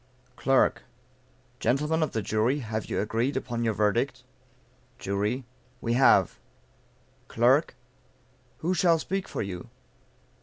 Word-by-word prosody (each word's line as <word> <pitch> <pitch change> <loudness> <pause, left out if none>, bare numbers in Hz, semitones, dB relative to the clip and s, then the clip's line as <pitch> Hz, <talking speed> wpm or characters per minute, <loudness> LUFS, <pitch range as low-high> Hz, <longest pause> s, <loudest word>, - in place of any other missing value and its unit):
Clerk. 135 -1 +2 0.8
Gentlemen 150 +5 +1
of 155 - 0
the 110 - -2
Jury, 110 +7 +1
have 110 -2 -4
you - - -2
agreed 115 +6 -1
upon 120 -3 -3
your 110 -2 0
verdict? 105 -2 0 0.7
Jury. 105 +6 -2 0.3
We 115 -1 -1
have. 130 +2 +4 0.9
Clerk. 125 +5 +2 0.9
Who 180 - +2
shall 175 -2 +3
speak 190 +4 -3
for - - -3
you? 90 -3 -7
120 Hz, 115 wpm, -27 LUFS, 110-145 Hz, 0.9 s, have